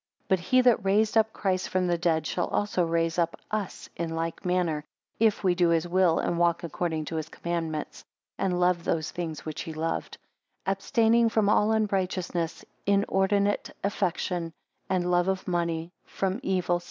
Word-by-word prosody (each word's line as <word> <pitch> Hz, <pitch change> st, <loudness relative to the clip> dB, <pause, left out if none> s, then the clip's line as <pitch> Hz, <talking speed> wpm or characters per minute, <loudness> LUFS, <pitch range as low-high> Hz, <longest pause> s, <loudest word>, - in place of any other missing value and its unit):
8 -, -, -41 dB
But 190 Hz, -, +3 dB
he 255 Hz, +8 st, +3 dB
that 245 Hz, -4 st, +4 dB
raised 210 Hz, +3 st, +2 dB
up 220 Hz, 0 st, +4 dB
Christ 185 Hz, -3 st, -1 dB
from 185 Hz, 0 st, +1 dB
the 175 Hz, -1 st, +2 dB
dead, 165 Hz, -2 st, +1 dB
shall 175 Hz, -, -1 dB
also 205 Hz, -3 st, 0 dB
raise 165 Hz, 0 st, 0 dB
up 170 Hz, -1 st, 0 dB
us 215 Hz, -3 st, -3 dB
in 165 Hz, -1 st, -3 dB
like 165 Hz, 0 st, -3 dB
manner, 180 Hz, -4 st, 0 dB, 0.4 s
if 220 Hz, -2 st, +3 dB
we 185 Hz, -2 st, +4 dB
do 175 Hz, -1 st, +3 dB
his 165 Hz, 0 st, +2 dB
will, 180 Hz, -1 st, +3 dB
and 170 Hz, -, 0 dB
walk 170 Hz, 0 st, +2 dB
according 165 Hz, -1 st, -2 dB
to 160 Hz, -, -4 dB
his 155 Hz, 0 st, -4 dB
commandments; 165 Hz, -3 st, -4 dB, 0.3 s
and 180 Hz, -2 st, 0 dB
love 180 Hz, -1 st, +2 dB
those 160 Hz, -2 st, -1 dB
things 165 Hz, -3 st, -5 dB
which 155 Hz, -1 st, -4 dB
he 160 Hz, -, -6 dB
loved: 160 Hz, +1 st, -3 dB, 0.5 s
9 -, -, +2 dB
Abstaining 230 Hz, +3 st, +3 dB
from 215 Hz, -2 st, +2 dB
all 210 Hz, +1 st, +4 dB
unrighteousness; 185 Hz, -5 st, -1 dB, 0.2 s
inordinate 200 Hz, 0 st, +2 dB
affection, 180 Hz, -3 st, -1 dB, 0.4 s
and 180 Hz, -1 st, +1 dB
love 175 Hz, 0 st, +3 dB
of 190 Hz, -1 st, -1 dB
money; 170 Hz, -1 st, -1 dB, 0.2 s
from 195 Hz, +2 st, -2 dB
evil. 180 Hz, -5 st, +1 dB
180 Hz, 175 wpm, -27 LUFS, 165-195 Hz, 0.5 s, that